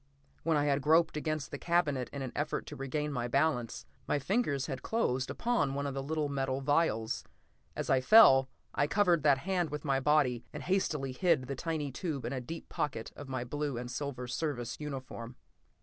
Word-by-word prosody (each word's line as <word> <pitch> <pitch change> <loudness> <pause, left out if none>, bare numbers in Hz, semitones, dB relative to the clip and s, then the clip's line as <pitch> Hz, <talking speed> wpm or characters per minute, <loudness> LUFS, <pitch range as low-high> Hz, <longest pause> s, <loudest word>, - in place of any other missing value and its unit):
When 160 -1 +2
I 145 - +2
had 140 -1 +2
groped 160 +3 +4
against 155 -1 -2
the 145 - -5
cabinet 155 -7 +1
in 140 -1 -4
an 130 - -4
effort 150 +1 -2
to - - -8
regain 150 +2 -2
my 120 -2 -1
balance, 135 -3 0 0.2
my - - +2
fingers 145 - 0
had 135 -3 -4
closed 130 - 0
upon 235 - 0
one 140 0 -2
of 140 - -2
the 135 - -3
little 150 +2 -1
metal 135 -1 -1
vials. 140 -6 +1 0.5
As - - -3
I 130 -1 +3
fell, 135 -6 +7 0.2
I 145 - +2
covered 180 -3 +3
that 145 -2 +5
hand 175 +2 -1
with 150 +1 -5
my 135 -2 +2
body 135 -4 +2
and - - -6
hastily 155 -8 0
hid 165 0 +2
the 140 +2 -4
tiny 155 -1 -2
tube 140 -4 -4
in 125 - -2
a 130 - -3
deep 165 +7 -7
pocket 120 -6 -3
of 145 -2 -9
my 130 -2 -2
blue 145 +1 -3
and 120 +1 -5
silver 125 -1 -4
Service 120 -2 -3
uniform. 130 -5 -6
140 Hz, 195 wpm, -32 LUFS, 130-155 Hz, 0.5 s, fell